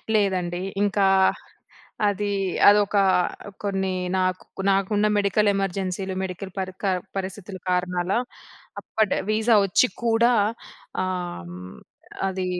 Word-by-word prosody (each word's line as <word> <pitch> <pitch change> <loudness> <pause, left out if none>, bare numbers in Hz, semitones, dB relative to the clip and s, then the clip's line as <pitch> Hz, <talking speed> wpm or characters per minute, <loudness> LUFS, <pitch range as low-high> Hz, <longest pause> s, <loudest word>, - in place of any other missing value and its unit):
లేదండి 185 -4 0 0.2
ఇంకా, 200 -1 +2 1.0
అది 205 0 -1 0.4
అదొక 205 0 +5 0.7
కొన్ని 190 -2 -1 0.2
నాకు 185 0 0 0.3
నాకున్న 205 +2 +2
మెడికల్ 205 +1 +2
ఎమర్జెన్సీలు 190 0 -2
మెడికల్ 190 +1 -6
పరి 185 -1 -3
క - - 0 0.3
పరిస్థితుల 195 0 -5
కారణాల 180 0 0 0.7
అప్పటి 220 -2 0
వీజా 220 +1 +3
వచ్చి 195 +6 +3 0.2
కూడా 235 +1 +4 0.7
ఆహ్, 180 - -4
హ్మ్ 90 +1 -9 0.5
అది 190 -1 -2
195 Hz, 100 wpm, -24 LUFS, 185-205 Hz, 1.0 s, అదొక